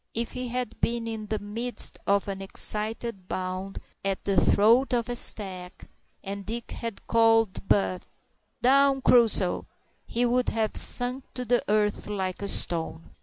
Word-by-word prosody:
If 235 +1 -3
he 250 0 -5
had 250 +1 -5
been 235 0 -1
in 220 -2 -6
the 215 +1 -2
midst 225 +4 0
of 200 0 +1
an 195 -1 -5
excited 210 0 -1
bound 185 +1 -5 0.3
at 195 -1 -2
the 195 -3 +2
throat 235 +6 +3
of 235 -1 -1
a 245 - -2
stag, 185 -6 0 0.4
and 200 +1 -6
Dick 230 +4 -5
had 230 -3 -7
called 225 -4 +2
out, 185 -2 0 0.6
"Down, 270 +1 +3
Crusoe," 220 -6 +3 0.4
he 240 +1 -1
would 245 +1 +1
have 220 -2 -2
sunk 250 +2 +4
to 250 -1 -4
the 245 +1 +1
earth 210 -1 0
like 190 -3 -4
a 200 - -3
stone. 165 -3 0
220 Hz, 155 wpm, -26 LUFS, 195-240 Hz, 0.6 s, sunk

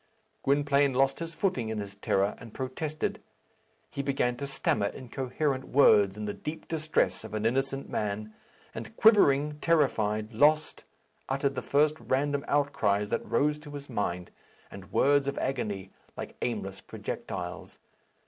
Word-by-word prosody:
Gwynplaine 140 -1 +2
lost 135 +1 +2
his 165 0 -6
footing 130 - 0
in 110 - -3
his 100 -1 -5
terror, 100 0 +1
and 115 -3 -12
protested. 145 +4 -3 0.7
He 140 - -3
began 135 -3 0
to 140 - -4
stammer 110 -6 0
incoherent 130 +3 -2
words 105 -7 +5
in 105 - -4
the 105 - -2
deep 155 +1 -7
distress 155 -6 0
of 110 -1 -7
an 110 0 -2
innocent 135 +3 0
man, 105 +1 -3 0.4
and 225 - -8
quivering, 150 -9 +5
terrified, 110 -10 +1
lost, 150 +6 +3 0.4
uttered 135 +1 0
the 125 - -3
first 150 +4 +2
random 140 +1 0
outcries 110 -8 +1
that 115 - -1
rose 150 +5 +1
to 150 0 -12
his 145 -2 -8
mind, 90 -5 -2 0.4
and 100 0 -11
words 140 0 +3
of 140 - -2
agony 105 -8 -2 0.3
like - - -6
aimless - - -3
projectiles. - - -6
135 Hz, 145 wpm, -29 LUFS, 110-145 Hz, 0.7 s, words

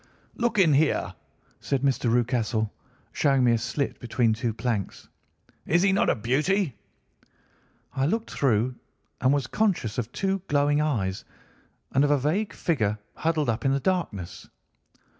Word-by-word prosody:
"'Look 235 -1 -1
in 175 -6 +5
here!' 150 +2 +2 0.5
said 140 -2 -2
Mr. 130 -4 +1
Rucastle, 115 -3 0 0.4
showing 135 -3 +2
me 120 - +4
a 115 - +3
slit 130 +5 -3
between 120 -1 +1
two 115 +1 -2
planks. 110 -3 -3 0.6
'Is 175 +3 +3
he 195 - +4
not 195 - +2
a - - +3
beauty?' 145 - 0 1.2
"I 135 +1 +1
looked 225 +6 -2
through 125 -2 +1 0.5
and 130 - +4
was 140 -3 +1
conscious 175 - 0
of 120 0 -4
two 195 +3 -1
glowing 145 +1 +2
eyes, 105 -11 -1 0.7
and 135 - +3
of 145 - +2
a 145 - +4
vague 165 +10 0
figure 110 -11 0 0.2
huddled 160 -2 0
up 115 -1 -1
in 135 - +2
the 140 - +1
darkness. 135 - -3
135 Hz, 150 wpm, -26 LUFS, 115-160 Hz, 1.2 s, in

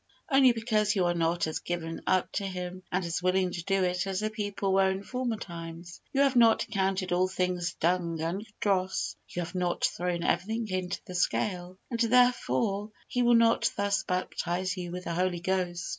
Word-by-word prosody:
Only 270 -2 +7
because 220 -2 +1
you 185 -3 +2
are 175 - +2
not 170 0 +1
as 155 - -3
given 165 -2 -4
up 185 -1 +2
to 200 - -2
Him 180 0 -5
and 180 0 0
as 170 +1 -2
willing 185 0 +2
to 175 -1 -5
do 195 +1 +1
it 180 +1 0
as 190 -1 -1
the 215 0 -1
people 205 -2 -2
were 190 0 +4
in 190 +1 -3
former 250 -1 -2
times. 170 -1 -8
You 275 - +2
have 275 -2 +3
not 230 -2 +5
accounted 195 -4 -1
all 180 +1 +3
things 180 -2 -1
dung 170 -1 0
and 170 +6 -2 0.2
dross. 190 -2 0
You 175 - -3
have 170 - -8
not 180 -1 -1
thrown 175 -1 -1
everything 220 +6 0
into 185 -1 -2
the 180 - -8
scale, 180 0 -1
and, 235 - -2
therefore, 230 -4 +2 0.2
He 245 - -1
will 240 0 +5
not 230 0 +4
thus 200 -1 +1
baptize 180 0 -2
you 180 -2 -5
with 180 +1 -5
the 170 - -3
Holy 180 0 0
Ghost. 175 -1 -1
185 Hz, 195 wpm, -29 LUFS, 175-210 Hz, 0.2 s, Only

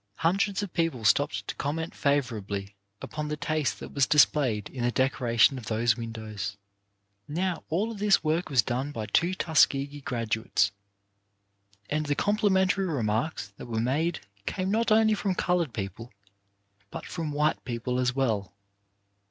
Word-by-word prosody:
Hundreds 195 - +1
of 200 - -6
people 165 -9 -1
stopped 105 -4 +2
to - - -2
comment 160 +3 -3
favourably 105 -8 -1 0.3
upon 150 0 -4
the 150 0 -3
taste 155 -1 -1
that - - -9
was 140 -2 +3
displayed 135 -8 +3
in 130 - -6
the 120 - +3
decoration 130 0 +3
of 115 - -11
those 115 0 +2
windows. 110 -3 -5 0.7
Now, 175 +3 -2
all 205 +8 0
this 205 -4 +3
work 160 +3 0
was 130 -6 +4
done 130 +6 -2
by 110 -6 -4
two 170 - +1
Tuskegee 145 -4 +2
graduates. 110 -5 0 1.2
And 150 0 -1
the 145 - +1
complimentary 195 -1 +2
remarks 115 - -1
that - - -9
were 115 -2 -2
made 145 +9 0 0.3
came 190 0 -1
not 225 +1 +1
only 220 0 +5
from 195 -2 -1
coloured 175 -6 +1
people 110 +2 -6 0.8
but - - -7
from 165 -4 -4
white 150 +2 +1
people 125 0 -2
as 125 0 +1
well. 105 -8 -1
140 Hz, 150 wpm, -28 LUFS, 115-165 Hz, 1.2 s, only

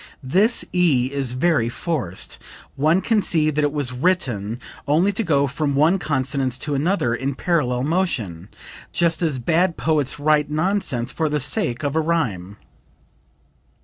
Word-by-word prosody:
"This 200 - +2
E 145 -8 +2
is 135 -3 -2
very 130 -3 +1
forced. 120 - -4 0.4
One 155 +6 +2
can 220 0 +2
see 155 -5 +2
that 150 0 0
it 145 - +1
was 145 -4 -2
written 125 - -1 0.3
only 165 +8 +3
to 225 - -1
go 145 -6 +2
from 140 +1 -2
one 160 +7 +3
consonance 135 -4 -1
to 150 - -3
another 140 -4 +1
in 135 +3 -2
parallel 130 -7 0
motion, 125 - -2 0.4
just 170 0 +1
as 155 -6 0
bad 170 +7 +1
poets 150 -3 0
write 150 0 +2
nonsense 155 -7 0
for 160 -2 -1
the 150 0 0
sake 120 -3 -1
of 145 +1 -1
a 160 - +3
rhyme." 110 - -2
145 Hz, 150 wpm, -21 LUFS, 125-170 Hz, 0.4 s, only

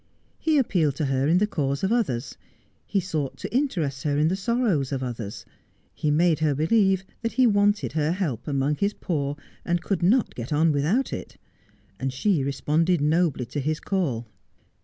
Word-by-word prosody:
He 315 -2 +2
appealed 170 - +2
to 150 - -1
her 135 0 +1
in 165 +3 +4
the 205 - +3
cause 140 -8 -2
of 190 - +1
others; 140 - -1 0.5
he 200 - +1
sought 160 -7 -3
to - - -6
interest 165 - 0
her 145 0 0
in 155 +2 +3
the 185 - 0
sorrows 200 - 0
of 135 -1 -2
others; 115 -5 -6 0.5
he 150 - -1
made 160 +2 +3
her 155 -2 +1
believe 190 +4 +2 0.2
that 230 -1 -2
he 255 +1 +4
wanted 205 -1 +2
her 155 0 0
help 155 - -3
among 145 +1 0
his 200 +1 0
poor 145 -5 -2 0.3
and 175 -1 -1
could 195 -2 -1
not 215 +8 +3
get 120 +3 -7
on 155 +2 +3
without 160 - +1
it; - - -7 0.6
and 135 0 -1
she 150 +3 +1
responded 155 +5 +1
nobly 150 -3 +1
to 125 +5 -4
his 155 +3 -1
call. 145 - -1
155 Hz, 180 wpm, -25 LUFS, 140-195 Hz, 0.6 s, in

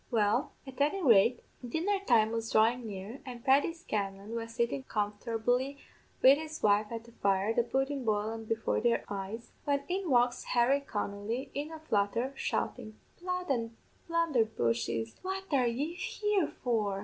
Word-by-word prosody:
"Well, 220 +2 +1
at 265 0 -7
any 325 +7 +2
rate, 235 -2 +5 0.2
dinner 335 - 0
time 220 -2 +5
was 225 0 -2
dhrawin' 230 +2 +3
near, 205 +5 -7
and 245 -2 -9
Paddy 275 +4 +4
Scanlan 205 -9 -4
was 230 0 -5
sittin' 235 +3 0
comfortably 230 +6 -1 0.5
wid 270 +3 +8
his 315 0 -7
wife 210 0 +4
at 230 -1 -4
the 235 - -16
fire, 200 0 +1
the 240 - +3
pudden 270 +3 -1
boilen 220 0 -1
before 225 0 0
their 235 0 +2
eyes, 205 +4 -5
when 280 -1 +1
in 370 -1 -2
walks 245 -2 +3
Harry 250 +4 +4
Connolly, 210 -1 -4
in 290 +2 -3
a 320 - -6
flutter, 235 -2 0
shoutin' 215 -4 -3 0.2
'Blood 360 -2 -2
an' 230 -3 -2 0.3
blunderbushes, 220 - 0
what 380 +1 -3
are 255 -3 +4
yez 290 +9 -2
here 415 -3 0
for?' 215 -8 -1
235 Hz, 155 wpm, -31 LUFS, 215-280 Hz, 0.5 s, wid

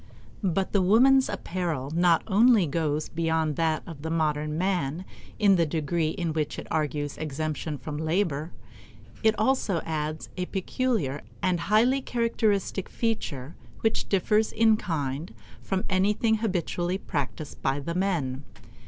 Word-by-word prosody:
But 190 -1 0
the 200 - +3
woman's 255 +8 +5
apparel 165 -7 -3
not 170 -1 +4
only 220 -1 +5
goes 155 0 -1
beyond 160 -2 0
that 160 -1 +1
of 160 -5 -9
the 160 - -4
modern 155 -1 0
man 180 -2 -1 0.3
in 200 -3 +5
the 170 - +3
degree 160 +1 0
in 170 -1 -2
which 155 -2 -2
it - - -6
argues 150 -2 -1
exemption 155 0 -3
from 150 +1 -6
labor; 160 -1 0 0.7
it 220 -1 +3
also 215 -5 +1
adds 155 -1 -3
a 180 0 -2
peculiar 190 - -1 0.2
and 180 -2 +2
highly 230 +9 +3
characteristic 220 -6 0
feature 165 - -2 0.3
which 225 0 0
differs 210 +3 +2
in 220 0 +4
kind 150 -4 -3 0.3
from 190 -1 -2
anything 210 +4 +2
habitually 180 -3 -1
practiced 150 -4 -4
by 135 +1 0
the 170 +4 -4
men. 165 -8 -1
170 Hz, 135 wpm, -27 LUFS, 155-200 Hz, 0.7 s, woman's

